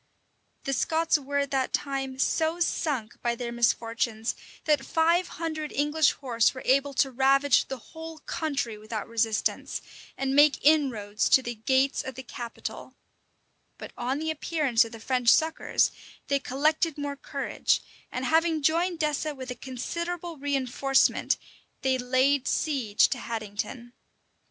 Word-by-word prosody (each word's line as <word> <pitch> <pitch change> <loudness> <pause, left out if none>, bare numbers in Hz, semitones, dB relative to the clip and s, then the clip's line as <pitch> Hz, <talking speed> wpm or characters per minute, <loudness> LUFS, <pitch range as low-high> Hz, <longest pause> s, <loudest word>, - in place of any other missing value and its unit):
The 275 - -1
Scots 320 +2 +2
were 285 0 -3
at 280 0 0
that 265 -2 0
time 270 -2 -2
so 320 +5 +1
sunk 280 -9 -1
by 235 0 0
their 235 0 -4
misfortunes, 230 -1 0 0.3
that 295 -3 +3
five 335 +4 +2
hundred 315 -2 -3
English 295 +1 +2
horse 240 -3 +1
were 260 - -7
able 275 +1 +2
to 270 0 +2
ravage 270 +1 +3
the 265 - -4
whole 320 +8 -10
country 280 -9 -3
without 215 0 -5
resistance, 225 -1 -1 0.4
and 270 0 -1
make 290 0 +6
inroads 235 -9 +2
to 265 - +5
the 240 - -3
gates 260 +5 +1
of 265 - -6
the 260 - -7
capital:[*] 240 -2 -7 0.8
but - - -9
on 255 +3 -2
the 315 +1 -1
appearance 300 -6 +2
of 230 - -8
the 225 - -9
French 250 +1 +1
succors, 320 +4 +3 0.4
they 280 0 +2
collected 305 +4 0
more 285 -1 -3
courage; 280 0 -1 0.3
and 255 +1 -3
having 320 +2 +2
joined 335 +4 +2
Dessé 300 0 -1
with 260 -1 -6
a - - -4
considerable 340 +8 -5
reënforcement, 270 -1 +2 0.5
they 260 -1 +2
laid 260 +2 +2
siege 255 -9 +2
to 255 - -2
Haddington. 230 +2 -5
270 Hz, 145 wpm, -27 LUFS, 245-305 Hz, 0.8 s, make